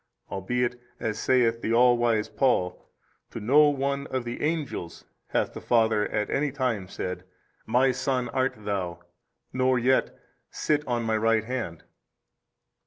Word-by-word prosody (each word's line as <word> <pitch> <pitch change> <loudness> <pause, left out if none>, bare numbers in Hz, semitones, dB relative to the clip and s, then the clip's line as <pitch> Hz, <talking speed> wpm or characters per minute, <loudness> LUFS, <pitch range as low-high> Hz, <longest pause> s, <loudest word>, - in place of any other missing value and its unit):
albeit, 120 +5 -1 0.2
as 110 -2 -2
saith 115 -3 +2
the 110 - -1
all 120 +1 +5
wise 115 -3 +1
Paul, 90 -9 0 0.4
to - - -7
no 145 +8 +5
one 140 0 -1
of 130 -2 -2
the 120 0 -5
angels 150 - -3 0.2
hath - - -1
the - - -8
Father 110 -3 +2
at 105 0 -1
any 140 +1 0
time 125 -8 -1
said, 90 0 -5 0.4
My 130 +2 +3
Son 130 -1 -1
art 130 +2 0
THOU, 95 -4 -2 0.6
nor 130 0 +2
yet, 130 +2 +1 0.3
Sit 150 -1 0
on 120 -1 0
My 110 -1 +1
Right 115 0 +2
Hand. 110 -9 -4
120 Hz, 145 wpm, -26 LUFS, 110-130 Hz, 0.6 s, all